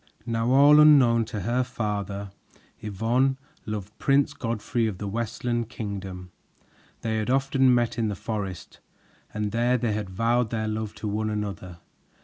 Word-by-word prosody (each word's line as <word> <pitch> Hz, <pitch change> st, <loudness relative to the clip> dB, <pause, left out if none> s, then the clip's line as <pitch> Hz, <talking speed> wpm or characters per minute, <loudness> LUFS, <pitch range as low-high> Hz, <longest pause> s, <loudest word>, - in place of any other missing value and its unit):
Now 115 Hz, 0 st, -1 dB
all 145 Hz, +3 st, +7 dB
unknown 130 Hz, -7 st, +6 dB
to 110 Hz, -1 st, -5 dB
her 120 Hz, +7 st, +1 dB
father, 100 Hz, -5 st, -4 dB, 0.5 s
Yvonne, 115 Hz, +6 st, 0 dB, 0.3 s
loved 105 Hz, -1 st, -5 dB
Prince 140 Hz, 0 st, +2 dB
Godfrey 115 Hz, 0 st, -2 dB
of 100 Hz, -4 st, -4 dB
the 100 Hz, -, -5 dB
Westland 115 Hz, +2 st, -2 dB
Kingdom. 95 Hz, -5 st, -6 dB, 0.7 s
They 110 Hz, -1 st, -1 dB
had 110 Hz, +1 st, -2 dB
often 135 Hz, 0 st, +3 dB
met 120 Hz, -1 st, +1 dB
in 115 Hz, -, +1 dB
the 105 Hz, -, -2 dB
forest, 100 Hz, -3 st, -5 dB, 0.5 s
and 105 Hz, -1 st, -3 dB
there 120 Hz, +3 st, +2 dB
they 115 Hz, -2 st, -1 dB
had 105 Hz, -2 st, -3 dB
vowed 115 Hz, +4 st, +1 dB
their 110 Hz, -1 st, -2 dB
love 110 Hz, 0 st, -3 dB
to 110 Hz, -, -5 dB
one 110 Hz, +1 st, -1 dB
another. 95 Hz, -5 st, -5 dB
110 Hz, 150 wpm, -26 LUFS, 105-120 Hz, 0.7 s, all